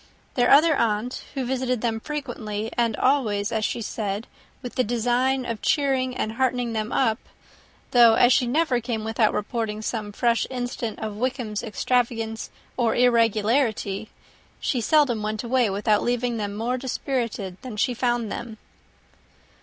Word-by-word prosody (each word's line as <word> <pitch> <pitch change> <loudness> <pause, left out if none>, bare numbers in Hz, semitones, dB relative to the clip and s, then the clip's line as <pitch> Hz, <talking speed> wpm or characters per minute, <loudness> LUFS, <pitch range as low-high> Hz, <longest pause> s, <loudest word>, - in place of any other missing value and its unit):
Their 245 -1 +2
other 310 +3 +6
aunt 230 +1 -1
also 265 - -1
visited 255 -2 -1
them 225 -2 -1
frequently, 225 -6 -4
and 230 -2 +1
always, 225 -6 +1
as 220 -1 -1
she 230 - -1
said, 205 0 -3 0.4
with 245 - -6
the 255 - +1
design 245 +3 +1
of 230 -3 -4
cheering 265 -3 +1
and 220 - -1
heartening 245 -1 0
them 220 +1 -2
up 230 -3 +2 0.7
though, 235 -2 +7
as 245 +2 +5
she 250 - +2
never 260 -2 +1
came 230 -2 -3
without 225 0 +2
reporting 215 0 -3
some 215 -2 -3
fresh 235 +2 +1
instance 245 -3 -4
of 215 -1 -4
Wickham's 245 -3 -2
extravagance 225 0 -1 0.3
or 235 -3 +2
irregularity, 225 -2 +2 0.5
she 250 - -1
seldom 260 -3 +3
went 215 +1 -3
away 245 -1 +2
without 205 +2 +1
leaving 245 -1 0
them 205 -2 -3
more 240 +4 -1
dispirited 235 -7 -3
than 245 -5 -7
she 245 +4 +1
found 240 -3 0
them. 225 0 -6
235 Hz, 150 wpm, -24 LUFS, 215-250 Hz, 0.7 s, though